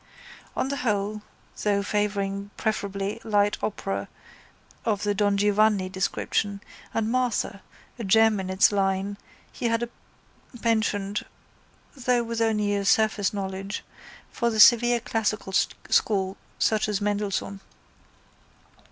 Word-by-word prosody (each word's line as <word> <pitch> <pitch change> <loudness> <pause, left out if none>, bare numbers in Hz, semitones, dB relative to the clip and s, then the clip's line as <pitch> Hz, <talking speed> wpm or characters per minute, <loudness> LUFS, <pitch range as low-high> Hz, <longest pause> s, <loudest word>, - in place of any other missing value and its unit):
On 265 - -1
the 280 - -2
whole 210 -3 -1 0.4
though 200 -1 +1
favouring 200 -1 -1
preferably 200 -1 -2
light 205 -1 +2
opera 100 - -3 0.8
of 210 -3 0
the 205 0 +1
Don 205 -1 +2
Giovanni 205 -1 +3
description 200 +2 -1 0.3
and 225 0 -1
Martha, 245 -5 0 0.4
a - - -3
gem 220 +1 +4
in 190 -1 -4
its 190 +2 +4
line, 195 0 0 0.3
he 240 - -2
had 230 0 +1
a 240 - -4 0.7
penchant, 210 -3 0 0.7
though 245 -2 +1
with 230 0 -3
only 210 -2 +1
a 200 -1 0
surface 215 -1 +2
knowledge, 195 0 -4 0.5
for 235 -2 0
the 220 -2 -2
severe 240 +2 +7
classical 215 -3 -2
school 195 0 +1 0.2
such 215 -1 +1
as 205 -2 0
Mendelssohn. 205 -1 -2
205 Hz, 120 wpm, -26 LUFS, 200-220 Hz, 0.8 s, severe